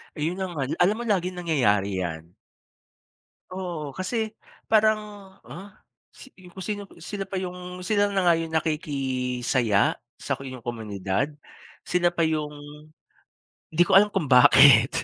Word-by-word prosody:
Ayun 165 +5 -3
ang 185 -2 -4
al 135 -1 -3
alam 190 +4 +3
mo 240 - -5
laging 185 -5 -1
nangyayari 105 - +1
'yan. 85 -1 -5 1.2
Oo, 170 -7 -5
kasi 185 +6 -3 0.6
parang, 215 0 +4 0.5
ah, 195 +3 -9 0.5
si - - -12 0.2
ku 190 - -12
si 210 - 0 0.4
sino 200 -1 -3
pa - - -3
'yung 180 -1 -5 0.3
sila 205 -2 +2
na 195 - 0
nga 170 - +6
'yung 165 -1 -5
nakikisaya 130 -7 -1 0.5
sa - - 0
inyong 130 -2 -9
komunidad, 105 +1 -3 0.6
sila 175 -1 +2
pa 170 -2 +1
'yung 155 -2 -2 1.2
'di 170 - +2
ko - - +7
alam 210 +1 +5
kung 165 -8 -1
bakit. 125 -1 +7
155 Hz, 135 wpm, -25 LUFS, 125-185 Hz, 1.2 s, ko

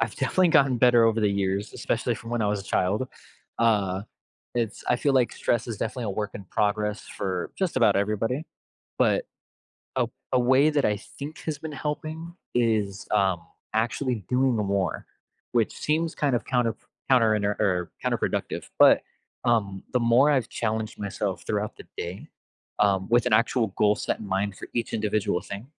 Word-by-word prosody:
I've 115 -2 -1
definitely 180 +6 +2
gotten 140 -6 +4
better 120 -2 +6
over 115 0 +3
the 105 - +3
years, 100 +1 -1
especially 120 +1 -1
from 115 +1 -9
when 120 -2 0
I - - +1
was 105 -1 0
a - - -11
child. 105 +9 0 0.5
Uh, 100 -5 +2 0.5
it's 115 -4 -2
I 120 - +4
feel 140 +2 +1
like 130 -3 +3
stress 120 -2 0
is 115 - -3
definitely 125 +3 -3
a 105 - -2
work 105 +1 -2
in 100 - -7
progress 105 +2 0
for 95 -2 -4
just 190 -3 -1
about - - +4
everybody, 110 +8 0 0.6
but - - +3 0.7
a - - +2 0.3
a - - +5
way 130 +5 +5
that 145 -2 +1
I 105 -1 +1
think 145 +8 -9
has 155 -2 -3
been 160 +1 -7
helping 155 +3 -4 0.2
is, 110 -5 +1
um, 95 -3 +2 0.3
actually 115 +1 0
doing 130 0 +2
more, 100 -3 -1 0.5
which 115 -3 +2
seems 160 +2 0
kind 140 -4 +1
of 120 - -1
counterp 120 -4 +1 0.3
counterinter 105 -6 +2 0.2
uh, - - +3
counterproductive, - - -1
but, - - +7 0.4
um, 100 -5 +1
the 125 - +3
more 120 +5 +5
I've 130 -5 +2
challenged 110 -1 -2
myself 100 -3 -3
throughout 105 0 -2
the - - -11
day, 90 +3 -5 0.5
um, 95 -2 +2
with 120 +1 +4
an 125 - +2
actual 115 +1 +3
goal 105 0 +4
set - - -2
in 105 - -7
mind 95 +1 -1
for - - -9
each 120 - -2
individual 105 -3 0
thing, 100 +3 -7
110 Hz, 175 wpm, -26 LUFS, 100-125 Hz, 0.7 s, but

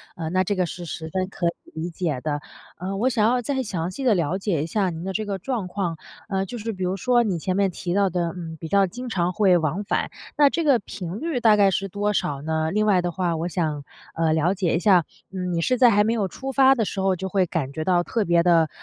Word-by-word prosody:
啊， 160 -2 -4
那 185 +2 +2
这 205 +2 -1
个 180 -1 +1
是 175 +1 -7
十 160 0 -6
分 185 +2 -1
可 175 -3 -2
以 - - +2 0.3
理 175 - -3
解 160 -7 -3
的。 145 -1 -2 0.4
呃， 190 +3 -4
我 250 +5 +2
想 220 -4 +2
要 245 +1 +2
再 265 +2 -1
详 180 -5 -3
细 270 - -6
地 235 - +5
了 170 +2 0
解 185 -7 -1
一 - - -2
下 190 +2 0
您 165 0 -6
的 190 - -3
这 215 +1 -2
个 200 -1 -3
状 215 -1 -3
况。 180 -4 -3 0.3
呃， 195 -1 0
就 240 - -7
是 225 +1 -3
比 185 -1 -5
如 185 +1 0
说 240 +2 +3
你 190 -6 -1
前 185 +3 -2
面 195 -2 +2
提 175 0 -4
到 200 -1 +3
的， 170 -1 -1
嗯， 165 -2 -7
比 160 - -6
较 200 +2 +4
经 245 +5 -7
常 180 -4 0
会 190 -4 +4
往 160 +5 -1
返， - - -1 0.3
那 290 -1 +6
这 335 - -1
个 275 -6 +4
频 185 0 -7
率 315 -5 -2
大 220 -3 +5
概 200 -2 +4
是 195 +2 -1
多 205 +2 -1
少 140 -6 -1
呢？ 160 +1 -1
另 215 +1 +1
外 190 -4 +4
的 175 0 -2
话， 175 -2 -1
我 170 +2 -2
想， 155 -4 -2 0.3
呃， 160 -1 +1
了 165 +4 +2
解 180 -4 0
一 - - +1
下， 180 -6 +4 0.3
嗯， 180 -2 -3
你 165 - 0
是 255 +8 +1
在 245 -1 +7
还 210 -1 +4
没 225 +2 +1
有 205 -4 0
出 270 +8 -6
发 270 0 +5
的 225 - +1
时 195 - -4
候， 190 -1 +2
就 190 +2 -4
会 190 -2 +2
感 155 -6 -3
觉 155 - -3
到 175 -1 +2
特 220 +3 -1
别 170 -1 +3
地， 165 -3 +4
185 Hz, 295 characters per minute, -24 LUFS, 170-210 Hz, 0.4 s, 在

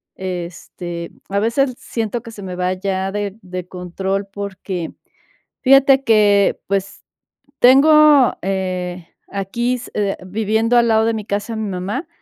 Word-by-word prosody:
Este, 175 -1 -6 0.2
a 200 +1 0
veces 250 +4 +1
siento 230 0 -3
que 230 - -9
se 205 -2 -10
me 185 -1 -5
va 180 +1 0
ya 190 0 -2
de 205 0 -4
de 180 -1 -7
control 190 +2 -3
porque 195 -3 -5 0.7
fíjate 270 0 +6
que, 210 -4 +4
pues, 195 0 -2 0.6
tengo, 290 +1 +6
eh, 185 -2 -3 0.2
aquí 220 +6 -2
s 245 - -9 0.3
viviendo 220 +4 +1
al 235 0 +4
lado 220 0 +3
de 230 - +1
mi 215 -2 -4
casa, 205 +3 -3
a - - -4
mi 215 -2 -3
mamá. 195 - -4
200 Hz, 140 wpm, -19 LUFS, 185-230 Hz, 0.7 s, fíjate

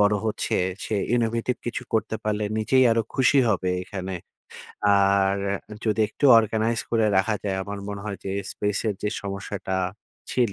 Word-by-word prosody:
বড় 105 0 +4
হচ্ছে। 110 - -1 0.3
সে 110 - -2 0.2
innovative 115 +1 0
কিছু 120 +2 -3
করতে 110 0 0
পারলে 105 0 0
নিজেই 130 +4 +4
আরো 115 0 +2
খুশি 135 +2 +4
হবে 95 -3 +1
এখানে। 95 -1 -5 0.8
আর 100 0 +3 0.5
যদি 110 -1 +1
একটু 110 - -5
অর্গানাইজ 110 +1 +1
করে 115 -2 +3
রাখা 95 +3 +2
যায়, 95 -2 -1
আমার 100 +1 -6
মনে 100 -1 -5
হয় 105 -2 -4
যে 95 - -3 0.2
স্পেস 105 -1 -1
এর 105 - 0
যে 105 - +1
সমস্যাটা 100 -1 -4 0.5
ছিল। 120 -5 +1
105 Hz, 160 wpm, -25 LUFS, 100-115 Hz, 0.8 s, বড়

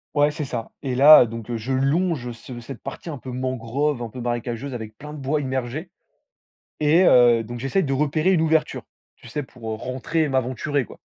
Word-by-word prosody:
Ouais, 145 0 +4
c'est 150 +1 -4
ça. 120 -4 -5
Et 130 -2 -2
là 140 +1 +9
donc, 115 0 -8
heu, 120 - -2
je 115 +4 -4
longe 135 -1 0
ce 120 +1 -10
cette 120 +1 -10
partie - - -7
un 150 - -5
peu 130 0 -8
mangrove, 130 +2 -2
un 115 - -5
peu 125 - -9
marécageuse 120 +2 -3
avec 110 -3 -7
plein 150 +1 -9
de - - -8
bois 140 +3 0
immergé. 130 +4 -3 0.9
Et 155 +4 +4
heu, 120 -4 +6
donc 120 +2 -7
j'essaye 135 +10 0
de 135 -3 -1
repérer 150 +6 +1
une 170 - +2
ouverture, 160 -1 +1 0.3
tu - - -16
sais, 135 +6 -3
pour 125 -3 -14 0.2
rentrer 130 +6 -2
et 155 - +1
m'aventurer 130 +2 -1
quoi. - - -14
130 Hz, 205 wpm, -23 LUFS, 120-150 Hz, 0.9 s, là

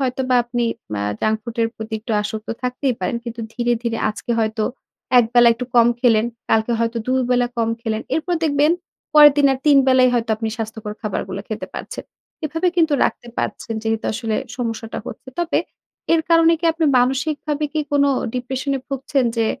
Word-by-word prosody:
হয়তোবা 255 -1 0
আপনি 240 0 -1 0.4
আ - - -1 0.2
junk 215 0 +2
food 235 +1 -8
এর 225 - +2
প্রতি 220 0 -6
একটু 225 +1 -4
আসক্ত 215 +1 -5
থাকতেই 250 +1 -1
পারেন 185 +6 -1
কিন্তু 235 0 -6
ধীরে, 240 0 +1
ধীরে 230 -1 -2
আজকে 215 - -8
হয়তো 220 -1 0 0.5
১ 240 - +6
বেলা 240 -1 +7
একটু 250 +2 -5
কম 235 -1 +7
খেলেন, 230 -3 +4 0.2
কালকে 220 +2 +2
হয়তো 230 0 0
২ 255 - 0 0.2
বেলা 245 -1 +3
কম 225 -1 +1
খেলেন। 220 -1 -2
এরপর 345 +3 0
দেখবেন 295 +1 +3 0.4
পরেরদিনে 290 -2 +7
৩ 295 -2 +6
বেলাই 255 -1 +5
হয়তো 230 -1 0
আপনি 225 0 -3
স্বাস্থ্যকর 220 -1 -5
খাবারগুলা 195 -2 -3
খেতে 215 - -4
পারছেন। - - -6 0.4
এভাবে 325 +4 0
কিন্তু 325 -3 +3
রাখতে 240 - -2
পারছেন 225 - -3
যেহেতু 225 0 -1
আসলে 225 0 -2 0.2
সমস্যাটা 225 -2 -4
হচ্ছে। 260 - -9
তবে 345 - +1 0.6
এর 325 - +2
কারণে 330 0 +6
কি - - -5
আপনি 325 0 -1
মানসিকভাবে 290 +4 0
কি 310 - 0
কোন 285 -1 +4 0.3
ডিপ্রেশনে 265 +2 -2
ভুগছেন? 275 -1 0
যে 225 -1 +2
245 Hz, 175 wpm, -20 LUFS, 225-280 Hz, 0.6 s, বেলা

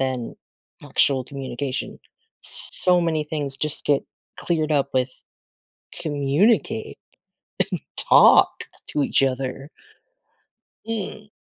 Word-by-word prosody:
then 130 -3 -3 0.5
actual 135 -2 +3
communication. 135 -1 -5 0.4
S - - +6
so 180 -1 +3
many 160 -3 -1
things 145 -3 -3
just 150 +1 -1
get 145 -2 +1 0.3
cleared 155 -3 -1
up 140 -2 +1
with 130 0 0 0.9
communicate 170 +9 0 0.8
and 170 - -5
talk - - +5 0.2
to 150 - 0
each 135 - +3
other. 135 +1 -3 1.2
Mm. 215 -1 -6
145 Hz, 100 wpm, -22 LUFS, 135-170 Hz, 1.2 s, S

